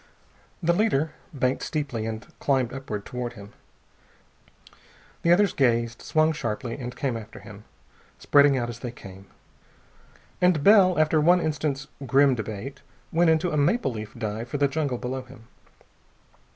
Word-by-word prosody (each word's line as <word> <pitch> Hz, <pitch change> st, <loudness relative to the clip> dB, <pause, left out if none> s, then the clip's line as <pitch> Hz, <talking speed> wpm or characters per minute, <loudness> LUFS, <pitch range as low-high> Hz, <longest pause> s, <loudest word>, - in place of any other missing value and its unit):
The 170 Hz, +1 st, +3 dB
leader 165 Hz, -7 st, +1 dB, 0.2 s
banked 130 Hz, -3 st, -1 dB
steeply 135 Hz, -8 st, -3 dB
and 110 Hz, 0 st, -5 dB
climbed 130 Hz, -4 st, +1 dB
upward 110 Hz, -7 st, -5 dB
toward 125 Hz, -1 st, -5 dB
him. 100 Hz, -2 st, -12 dB, 1.7 s
The 170 Hz, -, +3 dB
others 195 Hz, +2 st, +4 dB
gazed, 120 Hz, -4 st, +1 dB
swung 155 Hz, 0 st, +2 dB
sharply, 115 Hz, -5 st, -4 dB
and 125 Hz, -1 st, -6 dB
came 135 Hz, -5 st, -2 dB
after 110 Hz, -2 st, -9 dB
him, 105 Hz, 0 st, -13 dB, 0.5 s
spreading 140 Hz, -1 st, +4 dB
out 120 Hz, -2 st, -1 dB
as 120 Hz, -1 st, -7 dB
they 125 Hz, -, -5 dB
came. 95 Hz, -4 st, -12 dB, 1.1 s
And 180 Hz, -5 st, +3 dB
Bell, 195 Hz, -2 st, +6 dB
after 155 Hz, 0 st, +3 dB
one 175 Hz, +4 st, +5 dB
instant's 150 Hz, -3 st, -2 dB, 0.2 s
grim 135 Hz, +1 st, +5 dB
debate, 110 Hz, +2 st, -6 dB, 0.3 s
went 170 Hz, +1 st, +3 dB
into 160 Hz, +2 st, +2 dB
a 150 Hz, -, -1 dB
maple 145 Hz, -, +2 dB
leaf 110 Hz, -2 st, -7 dB
dive 110 Hz, +1 st, -4 dB
for 145 Hz, -, -2 dB
the 140 Hz, 0 st, +3 dB
jungle 140 Hz, -3 st, -2 dB
below 130 Hz, +2 st, -4 dB
him. 125 Hz, -3 st, -16 dB
135 Hz, 150 wpm, -25 LUFS, 115-155 Hz, 1.7 s, Bell